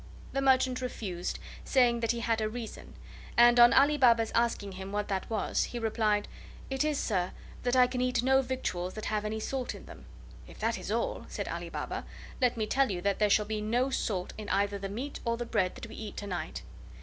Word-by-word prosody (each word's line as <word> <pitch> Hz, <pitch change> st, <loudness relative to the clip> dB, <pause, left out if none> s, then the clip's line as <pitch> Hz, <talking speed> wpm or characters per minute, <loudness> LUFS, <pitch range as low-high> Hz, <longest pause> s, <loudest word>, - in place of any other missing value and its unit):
The 275 Hz, -, 0 dB
merchant 260 Hz, -1 st, +3 dB
refused, 195 Hz, -8 st, -4 dB, 0.3 s
saying 245 Hz, -3 st, +3 dB
that 230 Hz, -1 st, -1 dB
he 235 Hz, +1 st, 0 dB
had 225 Hz, -1 st, +1 dB
a 215 Hz, -, 0 dB
reason; 230 Hz, 0 st, -8 dB, 0.4 s
and, 240 Hz, 0 st, +7 dB
on 240 Hz, 0 st, +9 dB
Ali 290 Hz, +2 st, +5 dB
Baba's 230 Hz, -3 st, +5 dB
asking 230 Hz, -4 st, +1 dB
him 190 Hz, +1 st, -7 dB
what 205 Hz, 0 st, -2 dB
that 190 Hz, -1 st, -2 dB
was, 220 Hz, -2 st, 0 dB
he 245 Hz, -, -6 dB
replied: 220 Hz, -2 st, +1 dB, 0.4 s
"It 270 Hz, +2 st, +1 dB
is, 305 Hz, -2 st, +1 dB
sir, 185 Hz, -7 st, 0 dB, 0.3 s
that 245 Hz, 0 st, +1 dB
I 250 Hz, -1 st, +7 dB
can 250 Hz, 0 st, -2 dB
eat 250 Hz, -1 st, +1 dB
no 265 Hz, +1 st, +5 dB
victuals 185 Hz, -9 st, -3 dB
that 215 Hz, -, -5 dB
have 215 Hz, -1 st, -1 dB
any 220 Hz, +1 st, -2 dB
salt 255 Hz, +3 st, -3 dB
in -, -, -11 dB
them." -, -, -12 dB, 0.4 s
"If -, -, -13 dB
that -, -, -1 dB
is -, -, -7 dB
all," -, -, -1 dB
said -, -, -4 dB
Ali -, -, -4 dB
Baba, -, -, -4 dB, 0.4 s
"let 245 Hz, -2 st, +3 dB
me 220 Hz, -, 0 dB
tell 270 Hz, +4 st, +2 dB
you 185 Hz, -3 st, -2 dB
that 200 Hz, +1 st, 0 dB
there 210 Hz, -1 st, +3 dB
shall 210 Hz, +1 st, +4 dB
be 215 Hz, 0 st, -3 dB
no 240 Hz, +5 st, +1 dB
salt 190 Hz, -8 st, -2 dB
in 210 Hz, -, -6 dB
either 200 Hz, +1 st, +1 dB
the 195 Hz, 0 st, -4 dB
meat 255 Hz, +8 st, -5 dB
or 235 Hz, -1 st, 0 dB
the 240 Hz, -, -3 dB
bread 190 Hz, -6 st, 0 dB
that -, -, -7 dB
we 225 Hz, -, -10 dB
eat 215 Hz, -2 st, -7 dB
to 205 Hz, -, -4 dB
night." 175 Hz, -5 st, -4 dB
230 Hz, 225 wpm, -30 LUFS, 205-250 Hz, 0.4 s, on